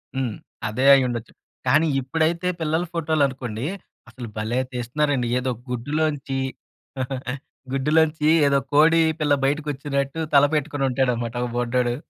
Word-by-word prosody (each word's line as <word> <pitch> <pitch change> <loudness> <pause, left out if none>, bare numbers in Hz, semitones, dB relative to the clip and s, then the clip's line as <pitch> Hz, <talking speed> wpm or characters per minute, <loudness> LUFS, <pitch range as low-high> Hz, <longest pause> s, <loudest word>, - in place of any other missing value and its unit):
హ్మ్. 130 -5 -2 0.3
అదే 125 +5 -1
అయ్యుండొచ్చు. 125 -4 +1 0.3
కానీ 155 +6 +4
ఇప్పుడైతే 160 +6 0
పిల్లల 160 +2 0
ఫోటోలు 160 -3 +1
అనుకోండి 125 -3 -5 0.4
అసలు 120 -2 -8
భలే 110 +4 -1
తీస్తున్నారండి. 125 +1 0
ఏదో 130 0 -1 0.2
గుడ్డులోంచి, 140 +2 -1 1.3
గుడ్డులోంచి 150 +3 +2 0.2
ఏదో 140 0 +3
కోడి 165 +3 +6 0.2
పిల్ల 145 -1 +3
బయటకి 150 +2 0
వచ్చినట్టు 140 +1 -2 0.2
తల 140 0 +7
పెట్టుకొని 145 -2 0
ఉంటాడు 130 0 +1
అన్నమాట 115 0 -4
ఒక 125 - -2
బుడ్డోడు. 120 0 0
135 Hz, 125 wpm, -23 LUFS, 125-150 Hz, 1.3 s, తల